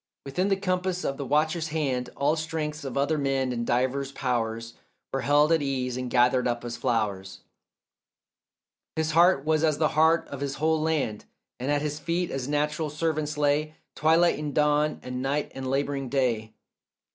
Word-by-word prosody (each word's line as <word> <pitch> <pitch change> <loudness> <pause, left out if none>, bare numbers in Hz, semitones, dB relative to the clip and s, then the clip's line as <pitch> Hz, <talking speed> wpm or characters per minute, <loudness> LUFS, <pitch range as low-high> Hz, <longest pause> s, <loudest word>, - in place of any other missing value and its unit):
Within 160 +8 -1
the 195 - +3
compass 185 -1 -1
of 135 - -2
the 140 - -4
watcher's 155 +3 +1
hand 140 -6 -1
All 145 +3 +2
strengths 155 -1 -3
of 135 -1 -5
other 145 +3 +1
men 135 -2 0
and 120 -1 -3
divers 130 +3 0
powers 115 -3 -2 0.4
Were 135 - 0
held 145 +3 +4
at 165 -2 +4
ease 130 -3 -1
and 125 -1 -3
gathered 125 +1 +3
up 120 0 -2
as 120 -1 -4
flowers; 105 -6 -2 1.5
His 160 0 0
heart 170 -3 +4
was 155 0 +2
as 155 -2 +2
the 155 0 +2
heart 160 +2 +3
of 140 -1 -7
his 140 0 -2
whole 160 +1 +1
land, 150 -10 -1 0.3
And 130 +3 -3
at 145 0 +1
his 150 0 -3
feet 170 +4 -1
as 135 -1 -3
natural 150 +1 0
servants 150 -1 -2
lay 150 +1 +1 0.2
Twilight 165 0 +3
and 150 -2 -4
dawn 150 0 +2
and 125 0 -4
night 140 +2 -1
and 130 -1 -5
labouring 135 -1 -1
day. 120 -5 0
145 Hz, 175 wpm, -27 LUFS, 130-155 Hz, 1.5 s, held